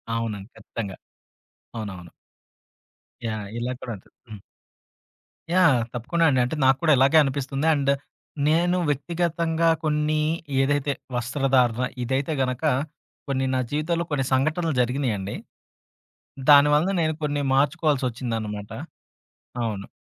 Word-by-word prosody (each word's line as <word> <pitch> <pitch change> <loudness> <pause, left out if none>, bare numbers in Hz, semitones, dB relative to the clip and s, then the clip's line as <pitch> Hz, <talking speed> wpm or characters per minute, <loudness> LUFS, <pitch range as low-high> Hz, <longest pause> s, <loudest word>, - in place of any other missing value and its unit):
అవునండి. 110 -3 -4
ఖచ్చితంగా. 100 -5 -6 0.8
అవునవును. 95 -6 -7 1.2
యాహ్! 110 -2 -4
ఇలా 125 +2 -2
కూడా 120 - -5
అదు 95 - -22 0.2
హ్మ్. 105 -3 -9 1.1
యాహ్! 175 -8 +5
తప్పకుండా 145 +8 0
అండి. 130 -3 +2
అంటే 125 - -3
నాకు 130 0 +5
కూడా 160 -2 +4
ఇలాగే 135 +4 +5
అనిపిస్తుంది. 135 +1 -2
అండ్ 140 -2 +1 0.6
నేను 175 +3 +3
వ్యక్తిగతంగా 165 +2 0
కొన్ని 155 0 +1 0.4
ఏదైతే 145 +1 +1 0.2
వస్త్రధారణ 125 -1 +1 0.2
ఇదైతే 135 +5 -1
గనక 130 +1 -2 0.7
కొన్ని 135 -1 0
నా - - +1
జీవితంలో 165 +3 -1
కొన్ని 135 -2 0
సంఘటనలు 155 +5 +1
జరిగినీయండి. 120 -6 -1 1.1
దాని 145 0 +8
వలన 165 +6 +2
నేను 160 -1 +1
కొన్ని 145 -1 0
మార్చుకోవాల్సొచ్చిందనమాట. 125 -8 0 1.0
అవును. 105 -3 -3
135 Hz, 110 wpm, -24 LUFS, 120-155 Hz, 1.2 s, దాని